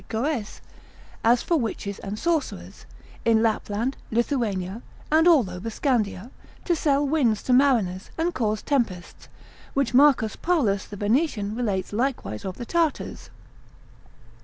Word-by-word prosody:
Goes) 230 -1 -2 0.6
as 235 +1 +4
for 340 - +2
witches 210 -5 -3
and 200 +1 -5
sorcerers, 330 +3 -3 0.4
in 225 -1 +3
Lapland, 225 +3 -1
Lithuania, 225 -5 -1 0.3
and 320 +2 +5
all 300 - +5
over 180 +5 -6
Scandia, 225 -3 -1 0.3
to 345 - +2
sell 290 -2 +1
winds 260 -8 +1
to 255 - +1
mariners, 230 -9 +2
and 335 +2 0
cause 215 -3 -1
tempests, 225 -11 -2 0.5
which 275 -4 +1
Marcus 260 -5 +4
Paulus 240 - +1
the 205 - -9
Venetian 210 - 0
relates 205 -5 -2
likewise 215 - -2
of 185 -1 -5
the 240 - -6
Tartars. 330 +2 -1
235 Hz, 130 wpm, -25 LUFS, 205-280 Hz, 0.6 s, and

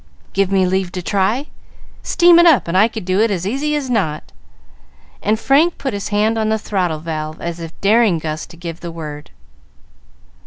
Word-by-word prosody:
"Give 195 -1 +1
me 190 -1 +3
leave 185 -1 -1
to 180 - -5
try? 205 +9 0 0.6
Steam 345 -1 +5
is 345 - +6
up, 310 - +4
and 170 - -2
I 205 +4 +5
could 220 -4 -7
do 185 +1 0
it 225 +1 +3
as 185 -3 -2
easy 280 +8 -1
as 290 -3 -2
not;" 190 -11 -2 0.9
and 215 +1 0
Frank 295 +8 +3
put 270 - -3
his 200 0 -4
hand 215 +2 +1
on 215 0 0
the 220 - +1
throttle 185 -6 -2
valve, 155 0 -5
as 170 0 -5
if 165 -1 -9
daring 210 -2 +3
Gus 155 -1 -5
to 170 - -15
give 170 -1 -7
the 175 - -7
word. 150 -3 -8
195 Hz, 195 wpm, -18 LUFS, 170-225 Hz, 0.9 s, is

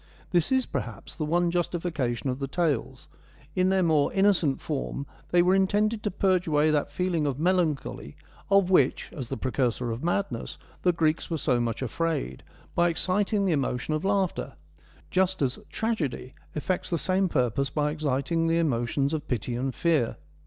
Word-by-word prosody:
This 175 +1 +2
is, 260 -1 +3
perhaps, - - -5
the 155 - -2
one 170 +2 +2
justification 165 -8 -1
of 125 - -5
the 135 - -2
tales; 135 -5 -1 0.5
in 185 0 +3
their 190 -1 +3
more 155 -4 +3
innocent 190 -8 +3
form 140 -2 -3 0.2
they 175 0 +4
were 180 +1 +4
intended 205 +3 +2
to 210 - -1
purge 185 -2 +1
away 155 0 +3
that 150 -1 0
feeling 175 -5 0
of 135 -2 -1
melancholy 160 - 0 0.3
of 195 -2 +4
which, 140 -8 +3
as 130 -5 -5
the 135 - -3
precursor 125 -2 -1
of 115 +5 -5
madness, 175 -8 -2 0.2
the 180 - +4
Greeks 160 -2 0
were 165 - -1
so 125 -4 +1
much 120 +1 -1
afraid, 130 - -2 0.3
by 175 0 +3
exciting 200 +4 +1
the 185 - +2
emotion 135 0 -1
of 155 - -1
laughter; 195 -8 0 0.6
just 190 0 +2
as 130 -1 0
tragedy 160 - -2 0.2
effects 175 +4 -2
the 170 - +1
same 185 +3 +1
purpose 130 -1 +1
by 150 0 0
exciting 155 +2 0
the 165 0 +2
emotions 140 -1 0
of 155 -2 -3
pity 120 0 -2
and 130 +1 -2
fear. 160 -9 +1
160 Hz, 170 wpm, -27 LUFS, 135-185 Hz, 0.6 s, they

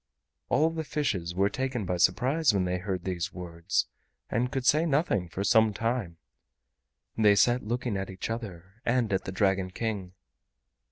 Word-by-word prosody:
All 155 +5 +3
the 160 -1 -3
fishes 105 - -2
were 100 +2 +3
taken 130 -5 -2
by 90 0 -1
surprise 125 - +3
when 95 -2 +1
they 90 0 -1
heard 95 -1 -3
these 90 -3 -3
words, 85 -5 -1 0.5
and 125 +2 0
could 130 -2 -2
say 155 +5 +4
nothing 135 - +1
for 95 - -3
some 110 0 +4
time. 115 -7 -2 1.0
They 105 -2 +5
sat 120 +5 +4
looking 120 -1 -1
at 95 0 -4
each 95 +3 -5
other 100 -2 -7
and 120 -3 +1
at 95 - 0
the 95 - -4
Dragon 95 -1 +1
King. 100 -2 -4
105 Hz, 165 wpm, -28 LUFS, 90-125 Hz, 1.0 s, They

